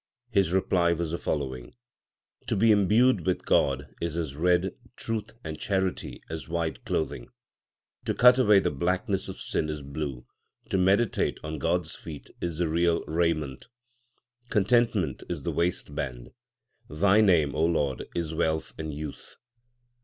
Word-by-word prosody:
His 100 Hz, -6 st, +2 dB
reply 90 Hz, -2 st, +2 dB
was 85 Hz, -1 st, -3 dB
the 85 Hz, -, -2 dB
following: 65 Hz, -4 st, -3 dB, 0.7 s
To -, -, 0 dB
be 110 Hz, +3 st, +5 dB
imbued 105 Hz, +1 st, +4 dB
with 90 Hz, +2 st, -1 dB
God 70 Hz, -1 st, +1 dB
is 85 Hz, -1 st, -2 dB
as 80 Hz, -5 st, -3 dB
red, 90 Hz, +3 st, +2 dB, 0.2 s
truth 110 Hz, -2 st, -4 dB
and 80 Hz, -1 st, -6 dB
charity 95 Hz, -2 st, -2 dB
as 80 Hz, -4 st, -6 dB
white 85 Hz, -1 st, -2 dB
clothing; -, -, -2 dB, 0.8 s
To -, -, -1 dB
cut 125 Hz, +1 st, +7 dB
away 105 Hz, -5 st, +6 dB
the -, -, 0 dB
blackness 90 Hz, +6 st, -1 dB
of 95 Hz, -, -7 dB
sin 75 Hz, -, -1 dB
is 75 Hz, -2 st, -4 dB
blue, 70 Hz, -3 st, -5 dB, 0.5 s
to 95 Hz, -, +2 dB
meditate 100 Hz, +5 st, +2 dB
on 80 Hz, -1 st, -4 dB
God 85 Hz, +5 st, +1 dB
s 80 Hz, -, -6 dB
feet 75 Hz, -3 st, -10 dB
is 85 Hz, -3 st, -3 dB
the 85 Hz, 0 st, +1 dB
real 85 Hz, +1 st, +2 dB
raiment; 80 Hz, -, -1 dB, 0.8 s
Contentment 105 Hz, -, +2 dB
is 85 Hz, -6 st, -4 dB
the -, -, -1 dB
waistband: 65 Hz, -7 st, -2 dB, 0.6 s
Thy 100 Hz, +8 st, +4 dB
name, 85 Hz, -8 st, +4 dB
Lord, 75 Hz, -3 st, 0 dB
is 80 Hz, -2 st, -2 dB
wealth 80 Hz, 0 st, -1 dB
and 80 Hz, -1 st, -3 dB
youth. 75 Hz, 0 st, -7 dB
85 Hz, 145 wpm, -27 LUFS, 75-95 Hz, 0.8 s, cut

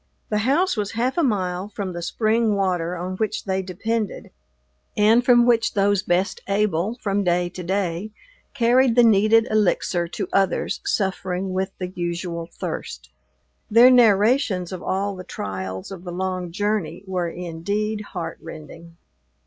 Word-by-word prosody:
The 210 Hz, -, +1 dB
house 360 Hz, +7 st, +2 dB
was 205 Hz, -1 st, -3 dB
half 245 Hz, +3 st, 0 dB
a 345 Hz, -, +2 dB
mile 190 Hz, -, -1 dB
from 195 Hz, -3 st, -5 dB
the 175 Hz, -, -5 dB
spring 220 Hz, +4 st, +1 dB
water 180 Hz, -3 st, -1 dB
on 185 Hz, +2 st, -4 dB
which 215 Hz, 0 st, -2 dB
they 190 Hz, -1 st, -1 dB
depended 210 Hz, +4 st, -3 dB, 0.7 s
and 220 Hz, +4 st, +5 dB
from 240 Hz, -1 st, +5 dB
which 230 Hz, -1 st, +2 dB
those 200 Hz, -1 st, +2 dB
best 180 Hz, +3 st, 0 dB
able, 200 Hz, 0 st, 0 dB
from 200 Hz, -1 st, 0 dB
day 175 Hz, -1 st, +1 dB
to 180 Hz, -, -8 dB
day, 185 Hz, +1 st, -2 dB, 0.5 s
carried 245 Hz, 0 st, +3 dB
the 245 Hz, -, +6 dB
needed 220 Hz, +1 st, +4 dB
elixir 180 Hz, -4 st, +1 dB
to -, -, -4 dB
others 195 Hz, -1 st, +1 dB
suffering 190 Hz, -1 st, -2 dB
with 190 Hz, +1 st, -1 dB
the 180 Hz, -1 st, -4 dB
usual 170 Hz, -1 st, -4 dB
thirst. 60 Hz, +1 st, -6 dB, 0.6 s
Their 235 Hz, +4 st, +7 dB
narrations 215 Hz, -, +3 dB
of 185 Hz, -2 st, -6 dB
all 195 Hz, +2 st, -2 dB
the 185 Hz, -, -8 dB
trials 95 Hz, -, -6 dB
of 185 Hz, -2 st, -8 dB
the 180 Hz, -, -6 dB
long 185 Hz, -1 st, -3 dB
journey 200 Hz, -3 st, -2 dB
were 180 Hz, -3 st, -2 dB
indeed 200 Hz, +6 st, -3 dB
heartrending. 165 Hz, -1 st, -8 dB
190 Hz, 150 wpm, -23 LUFS, 175-215 Hz, 0.7 s, Their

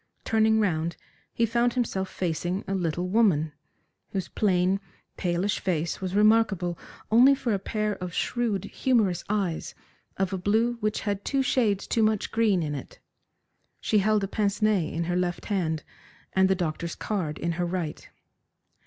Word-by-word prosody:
Turning 220 Hz, 0 st, +3 dB
round, 170 Hz, -5 st, 0 dB, 0.3 s
he 230 Hz, -, +1 dB
found 235 Hz, +1 st, +1 dB
himself 195 Hz, -7 st, -1 dB
facing 175 Hz, +2 st, -2 dB
a 195 Hz, -, -2 dB
little 175 Hz, -1 st, -1 dB
woman, 180 Hz, -7 st, +3 dB, 0.6 s
whose 190 Hz, -3 st, -2 dB
plain, 190 Hz, -1 st, +2 dB, 0.4 s
palish 180 Hz, +3 st, 0 dB
face 170 Hz, -2 st, -1 dB
was 190 Hz, 0 st, -3 dB
remarkable 210 Hz, -5 st, +3 dB, 0.4 s
only 255 Hz, +5 st, +7 dB
for 245 Hz, -4 st, -1 dB
a 200 Hz, -, 0 dB
pair 210 Hz, +1 st, -1 dB
of 180 Hz, -1 st, -5 dB
shrewd, 220 Hz, 0 st, -1 dB
humorous 220 Hz, -9 st, +1 dB
eyes 195 Hz, -6 st, -1 dB, 0.4 s
of 190 Hz, 0 st, 0 dB
a 190 Hz, -, -2 dB
blue 220 Hz, +6 st, +2 dB
which 215 Hz, -1 st, -1 dB
had 200 Hz, -1 st, -2 dB
two 275 Hz, -1 st, +1 dB
shades 215 Hz, -7 st, +1 dB
too 230 Hz, -, 0 dB
much 215 Hz, -1 st, +1 dB
green 215 Hz, -6 st, +2 dB
in 150 Hz, -1 st, -3 dB
it. 140 Hz, -, -7 dB, 0.8 s
She 215 Hz, -, +2 dB
held 210 Hz, +1 st, +2 dB
a -, -, 0 dB
pince 205 Hz, 0 st, -1 dB
nez 210 Hz, -7 st, +2 dB
in 165 Hz, -, -2 dB
her 175 Hz, +1 st, -1 dB
left 180 Hz, -1 st, -1 dB
hand, 165 Hz, -7 st, -1 dB, 0.5 s
and 190 Hz, 0 st, +4 dB
the 190 Hz, -, +3 dB
doctor's 170 Hz, -1 st, -3 dB
card 175 Hz, -8 st, -3 dB
in 170 Hz, -, -1 dB
her 175 Hz, +1 st, -1 dB
right. 175 Hz, -4 st, -4 dB
195 Hz, 160 wpm, -27 LUFS, 175-215 Hz, 0.8 s, only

